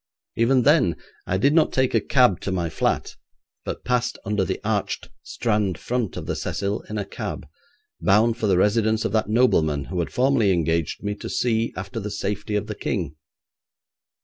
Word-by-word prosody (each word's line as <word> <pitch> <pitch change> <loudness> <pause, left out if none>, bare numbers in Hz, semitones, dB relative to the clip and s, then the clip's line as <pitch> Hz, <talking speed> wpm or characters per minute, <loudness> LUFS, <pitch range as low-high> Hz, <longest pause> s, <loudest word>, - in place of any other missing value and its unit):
Even 125 +2 +3
then 145 - +4 0.3
I 95 - +1
did 140 +9 +3
not 160 -1 +4
take 130 -1 +1
a 115 - +3
cab 125 -8 +3
to 100 - -4
my 85 -3 -1
flat, - - -1 0.5
but - - -6
passed 125 -1 0
under 105 -1 +1
the 90 - -2
arched - - -2
Strand 105 -7 -1
front 120 -1 -2
of - - -5
the - - -2
'Cecil' 100 +1 -2
in 105 - -3
a 100 - -2
cab, 105 +1 -6 0.6
bound 110 +4 +4
for 115 -3 -1
the 95 -3 +3
residence 110 +2 +2
of 115 - 0
that 110 0 0
nobleman 80 - +3
who 90 - -1
had 85 - -2
formerly 125 -5 +3
engaged 85 -1 0
me 105 0 -1
to - - -7
see 115 -1 0
after 100 +4 -5
the 105 0 -4
safety 105 +1 -3
of 105 - 0
the 105 - -5
King. 90 - -3
105 Hz, 185 wpm, -23 LUFS, 95-120 Hz, 0.6 s, then